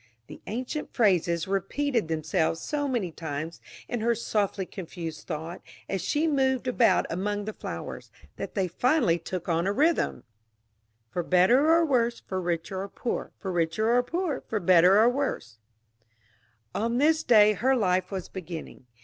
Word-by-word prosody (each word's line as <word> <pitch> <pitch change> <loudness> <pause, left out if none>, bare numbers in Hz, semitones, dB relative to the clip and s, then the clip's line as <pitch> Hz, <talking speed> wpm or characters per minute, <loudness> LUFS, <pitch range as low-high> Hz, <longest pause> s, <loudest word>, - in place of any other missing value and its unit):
the - - -12
ancient 255 +7 -4
phrases 175 -7 +2
repeated 230 - -1
themselves 160 +1 0
so 290 - -2
many 235 -10 -1
times 160 0 -6 0.3
in 240 - -3
her 235 +1 +2
softly 205 -3 -1
confused 165 -4 -7
thought, 165 +2 -5 0.3
as 195 - -2
she 305 +2 0
moved 265 -4 +1
about 250 -2 +3
among 205 +4 -2
the 215 - -4
flowers, - - -7 0.3
that - - -6
they 190 -3 +1
finally 185 - +2
took 175 +1 -5
on 170 +1 +1
a - - +2
rhythm 310 +9 +1 0.9
"For 175 - -1
better 210 - +4
or 335 0 +5
worse, 240 -5 +1
For 190 -1 -4
richer 175 +2 -2
or 200 - -6
poorer, 240 - -4
For 190 - -5
richer 180 +7 +1
or 245 - +5
poorer, 325 +2 -3
For 220 - -1
better 180 +1 +6
or 225 - +6
worse 245 - -2 0.6
" 110 +1 -37 0.3
On 230 +2 -1
this 310 +3 +3
day 215 -6 +6
her 260 +7 +2
life 185 -5 +1
was 190 -3 -5
beginning. 165 -8 -8
200 Hz, 160 wpm, -27 LUFS, 170-245 Hz, 0.9 s, better